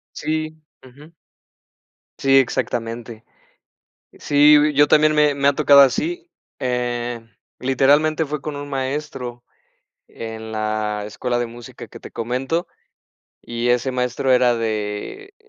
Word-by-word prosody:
Sí. 155 +1 -3 0.2
ujú. 140 +5 -16 1.1
Sí, 135 0 +3
exactamente. 120 -3 -2 1.0
Sí, 150 +1 +5 0.2
yo 145 +1 +5
también 155 0 +4
me 150 -1 +4
me 140 0 +1
ha 140 - +4
tocado 140 -1 +6
así, 345 - +1 0.3
eh, 120 -2 -2 0.4
literalmente, 145 +5 +2
fue 150 0 -5
con 150 -1 -5
un 145 0 -7
maestro 130 -3 -4 0.6
en 110 -1 -8
la 110 -1 -2
escuela 120 +3 -3
de 120 - -1
música 120 0 -11
que - - -13
te - - -12
comento, 130 +8 -2 0.8
y 120 +1 -3
ese 125 +2 +1
maestro 125 +1 0
era 125 -1 +4
de, 110 - -4
130 Hz, 120 wpm, -20 LUFS, 120-145 Hz, 1.1 s, tocado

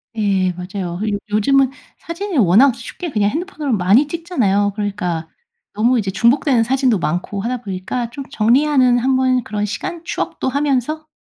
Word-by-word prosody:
예 195 -4 +1
맞아요. 180 0 -5
요 205 -2 -1
요즘은 265 +6 +3 0.3
사진이 345 +1 -5
워낙 230 +5 +5
쉽게 300 +9 -7
그냥 210 -4 +1
핸드폰으로 310 - -2
많이 205 +9 +3
찍잖아요. 250 - 0
그러니까 180 -6 -3 0.5
너무 235 +4 +2
이제 195 -3 -2
중복되는 235 +4 +2
사진도 260 -1 +2
많고 180 +4 -2
하다 245 +4 -2
보니까 200 +4 -4
좀 275 +3 -7
정리하는 255 +2 +3
한번 255 0 +2
그런 210 -1 -3
시간 335 - -5
추억도 300 - -3
하면서 285 +2 -1
235 Hz, 360 characters per minute, -18 LUFS, 205-275 Hz, 0.5 s, 워낙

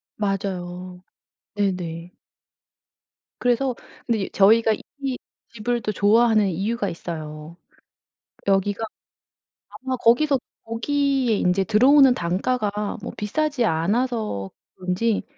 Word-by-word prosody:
맞아요. 185 -3 -4 0.5
네네. 180 -4 -2 1.3
그래서 245 +1 +1 0.3
근데 230 -2 0
이 - - -4
저희가 220 +3 +5 0.3
이 270 -2 -2 0.4
집을 235 +2 -2
또 215 - -2
좋아하는 215 +1 +4
이유가 205 +7 -1
있어요. 155 -1 -7 0.9
여기가 200 +2 +1 0.9
아마 260 0 -4
거기서 260 +4 +3 0.3
거기에 265 +1 +1
이제 180 +1 +2
들어오는 255 +6 +6
단가가 205 +3 -1
뭐 225 - -6
비싸지 275 +4 0
않아서 210 - -1 0.3
그런지 185 +4 -1
210 Hz, 225 characters per minute, -23 LUFS, 185-245 Hz, 1.3 s, 들어오는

